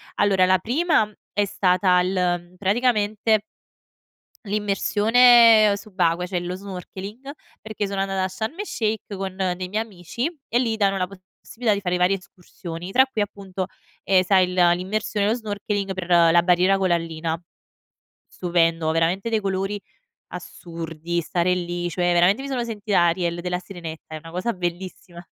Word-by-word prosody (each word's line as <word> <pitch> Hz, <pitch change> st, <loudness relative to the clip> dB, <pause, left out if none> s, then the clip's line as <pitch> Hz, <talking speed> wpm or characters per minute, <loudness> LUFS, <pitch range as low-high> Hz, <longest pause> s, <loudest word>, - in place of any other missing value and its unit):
Allora 195 Hz, -2 st, +3 dB
la 185 Hz, +1 st, +4 dB
prima 245 Hz, -, +1 dB, 0.2 s
è 205 Hz, 0 st, +1 dB
stata 185 Hz, -1 st, +2 dB
il 180 Hz, +1 st, -1 dB, 0.4 s
mhmm, 180 Hz, -, -22 dB
praticamente 215 Hz, 0 st, +1 dB, 1.0 s
l'immersione 215 Hz, +2 st, +5 dB
subacquea, 180 Hz, -4 st, -1 dB
cioè 180 Hz, 0 st, -2 dB
lo 175 Hz, +1 st, -4 dB
snorkeling, 200 Hz, +6 st, -8 dB, 0.3 s
perché 215 Hz, -1 st, -4 dB
sono 195 Hz, 0 st, -2 dB
andata 195 Hz, -1 st, -1 dB
a -, -, +1 dB
Sharm 220 Hz, -, -5 dB
el-Sheikh 220 Hz, -, -3 dB
con 190 Hz, -1 st, -5 dB
dei 185 Hz, -1 st, -2 dB
miei 215 Hz, +3 st, -1 dB
amici, 225 Hz, -, -5 dB
e 240 Hz, -, 0 dB
lì 235 Hz, -3 st, +1 dB
danno 195 Hz, -2 st, +2 dB
la 185 Hz, -, 0 dB, 0.3 s
possibilità 225 Hz, -3 st, -1 dB
di 200 Hz, -, -4 dB
fare 180 Hz, -1 st, -1 dB
varie 180 Hz, +2 st, +2 dB
escursioni, 180 Hz, -1 st, -9 dB
tra 260 Hz, +4 st, +5 dB
cui 260 Hz, -5 st, -3 dB
appunto, 195 Hz, -2 st, -4 dB, 0.4 s
ehm, 185 Hz, -1 st, +3 dB
sai 185 Hz, -1 st, +4 dB
il -, -, -5 dB
l'immersione 190 Hz, +4 st, +1 dB
e -, -, +2 dB
lo 225 Hz, -, +2 dB
snorkeling 205 Hz, -3 st, -3 dB
per, 185 Hz, -1 st, -6 dB
ehm, 170 Hz, -2 st, +5 dB
la 170 Hz, 0 st, +5 dB
barriera 180 Hz, +2 st, +3 dB
corallina. 165 Hz, -3 st, -1 dB, 0.9 s
Stupendo 165 Hz, -2 st, 0 dB
veramente 170 Hz, +7 st, 0 dB
dei 220 Hz, -, +1 dB
colori 195 Hz, +1 st, -2 dB, 0.5 s
assurdi, 165 Hz, 0 st, -6 dB
stare 175 Hz, +2 st, 0 dB
lì, 175 Hz, 0 st, -3 dB
cioè 175 Hz, +1 st, 0 dB
veramente 180 Hz, +8 st, +3 dB
mi 275 Hz, -, -6 dB
sono 255 Hz, -3 st, -2 dB
sentita 210 Hz, -4 st, -1 dB
Ariel 170 Hz, 0 st, 0 dB
della 180 Hz, 0 st, -2 dB
Sirenetta. 170 Hz, -4 st, -9 dB
È -, -, -4 dB
una 165 Hz, +1 st, -11 dB
cosa 185 Hz, +7 st, -2 dB
bellissima. 175 Hz, 0 st, -6 dB
190 Hz, 155 wpm, -23 LUFS, 175-210 Hz, 1.0 s, l'immersione